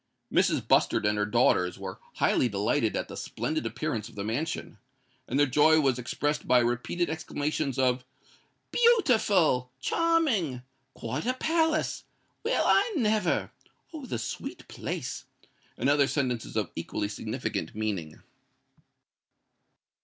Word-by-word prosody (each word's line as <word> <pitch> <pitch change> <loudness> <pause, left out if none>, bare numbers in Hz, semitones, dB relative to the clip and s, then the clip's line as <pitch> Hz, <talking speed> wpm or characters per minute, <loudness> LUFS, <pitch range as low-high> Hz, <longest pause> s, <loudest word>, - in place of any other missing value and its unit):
Mrs. - - +2
Bustard - - +3
and 105 0 +2
her 105 0 0
daughters 105 -5 +2
were 95 -1 -7 0.2
highly 125 - +2
delighted 105 +3 0
at - - -2
the - - -8
splendid - - -3
appearance 105 -2 -3
of - - -17
the 100 - -4
mansion; 120 +1 -3 0.5
and 130 - -1
their 145 - +5
joy 150 +4 +5
was 135 -4 +2
expressed 145 +4 -2
by 125 - +5
repeated 120 +9 0
exclamations 150 -3 -2
of 130 -1 +2 0.7
"Beautiful!"—"Charming!"—"Quite 180 - +1
a 255 - +1
palace!"—"Well, 320 +2 -1
I 465 - +4
never!"—"Oh! 220 - -2
the - - -2
sweet 115 0 -6
place!"—and 125 - -6
other 140 -1 +4
sentences 125 -7 -2
of 105 -5 -1
equally 95 +5 -3
significant 100 0 -4
meaning. 100 -8 -4
135 Hz, 115 wpm, -28 LUFS, 115-175 Hz, 0.7 s, their